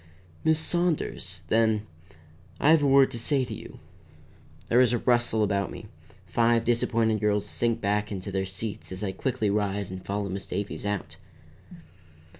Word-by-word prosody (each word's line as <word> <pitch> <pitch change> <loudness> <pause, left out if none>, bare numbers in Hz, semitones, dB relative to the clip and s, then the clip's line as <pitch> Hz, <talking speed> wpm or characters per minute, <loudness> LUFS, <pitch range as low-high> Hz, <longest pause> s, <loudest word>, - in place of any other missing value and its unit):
"Miss 160 0 +4
Saunders." 170 0 -1
Then, 110 -1 +2 0.7
"I 150 - +5
have 160 -2 +6
a 145 - +3
word 135 0 +5
to 120 - -4
say 135 +2 +1
to 120 - -6
you." - - -9 0.9
There 120 +2 +5
is 125 -2 +4
a - - +3
rustle 120 -2 +2
about 100 -1 0
me; - - -9 0.4
five 115 0 +2
disappointed 115 -2 +1
girls 105 0 +1
sink 115 +2 -1
back 105 +1 0
into 100 0 -5
their 95 0 -1
seats 100 +2 -5
as 95 +2 -5
I 95 - -1
quickly 105 +1 -1
rise 100 -2 -1
and 95 0 -7
follow 100 0 -2
Miss 95 0 -5
Davies 100 0 -4
out. 105 -2 -3
110 Hz, 165 wpm, -27 LUFS, 100-120 Hz, 0.9 s, have